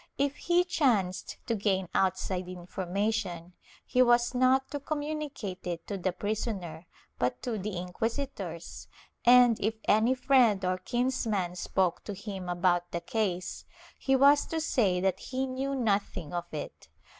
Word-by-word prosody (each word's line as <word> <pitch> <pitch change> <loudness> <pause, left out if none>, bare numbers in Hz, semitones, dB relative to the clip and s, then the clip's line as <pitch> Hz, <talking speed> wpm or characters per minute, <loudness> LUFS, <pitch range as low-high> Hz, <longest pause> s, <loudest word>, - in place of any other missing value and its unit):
If 280 0 +1
he 350 +1 +3
chanced 230 - 0
to 230 - 0
gain 195 -3 0
outside 185 -1 0
information, 185 0 -3 0.3
he 255 - +2
was 240 0 +4
not 255 +1 +3
to 290 - -3
communicate 290 -10 -4
it 170 -1 -4
to 205 - -4
the 185 -1 -1
prisoner 185 -4 -4 0.3
but 125 0 0
to 230 -4 -2
the 195 -1 -4
inquisitors 180 - -4 0.4
and, 245 -2 +7
if 220 +3 0
any 220 +5 +4
friend 250 -7 +3
or 185 0 0
kinsman 220 -5 -1
spoke 180 -1 0
to 205 - -5
him 190 -2 -6
about 175 0 +1
the 170 0 -3
case, 185 -1 -2 0.4
he 270 - +2
was 280 +2 +5
to 325 - -2
say 210 - +2
that 190 -1 +1
he 260 +1 -3
knew 265 +1 -2
nothing 200 - -1
of 175 0 -4
it. 150 - -7
205 Hz, 145 wpm, -29 LUFS, 180-255 Hz, 0.4 s, and